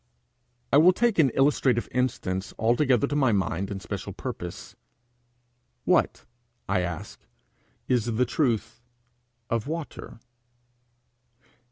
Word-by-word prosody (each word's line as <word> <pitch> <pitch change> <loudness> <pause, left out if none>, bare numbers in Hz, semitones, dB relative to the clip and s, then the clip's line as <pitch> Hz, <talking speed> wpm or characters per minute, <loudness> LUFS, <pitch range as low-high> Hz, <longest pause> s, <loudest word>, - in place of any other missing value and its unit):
I - - +8
will 175 +5 +7
take 230 -2 +1
an 145 -4 +6
illustrative 135 -3 +2
instance 105 -7 -2
altogether 120 +3 +3
to 145 - -3
my 135 -5 +3
mind 95 -1 -1
and 100 -1 -4
special 85 - -6
purpose. - - -7 1.1
What, - - +2 0.4
I 95 -1 +1
ask, 85 -2 -5 0.7
is 125 -4 +2
the 120 +1 +1
truth 120 -3 -1 0.7
of 115 +2 -1
water? 160 -6 -6
125 Hz, 110 wpm, -26 LUFS, 105-145 Hz, 1.1 s, I